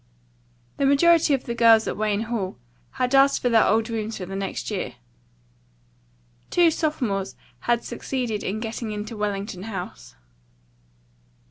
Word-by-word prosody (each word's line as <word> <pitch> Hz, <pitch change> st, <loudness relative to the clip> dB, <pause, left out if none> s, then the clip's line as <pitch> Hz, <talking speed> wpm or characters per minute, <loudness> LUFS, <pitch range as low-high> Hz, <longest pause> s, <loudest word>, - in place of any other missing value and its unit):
The 275 Hz, -, +2 dB
majority 310 Hz, +1 st, +5 dB
of 265 Hz, -, -5 dB
the 235 Hz, -, -4 dB
girls 230 Hz, -1 st, +5 dB
at -, -, -2 dB
Wayne 210 Hz, -1 st, 0 dB
Hall 220 Hz, -5 st, -3 dB, 0.4 s
had 255 Hz, 0 st, -1 dB
asked 275 Hz, 0 st, +5 dB
for 245 Hz, -, 0 dB
their 225 Hz, -2 st, +5 dB
old 220 Hz, +2 st, +2 dB
rooms 225 Hz, -1 st, -3 dB
for 185 Hz, -, -5 dB
the 195 Hz, +2 st, -7 dB
next 195 Hz, +2 st, -4 dB
year. 160 Hz, -12 st, -3 dB, 1.5 s
Two 345 Hz, -2 st, +4 dB
sophomores 245 Hz, -, -2 dB, 0.2 s
had 240 Hz, -1 st, 0 dB
succeeded 240 Hz, -3 st, -3 dB
in 205 Hz, +3 st, -2 dB
getting 225 Hz, 0 st, -4 dB
into 210 Hz, +2 st, -5 dB
Wellington 200 Hz, -2 st, -3 dB
House. 180 Hz, -, -7 dB
225 Hz, 140 wpm, -24 LUFS, 200-250 Hz, 1.5 s, majority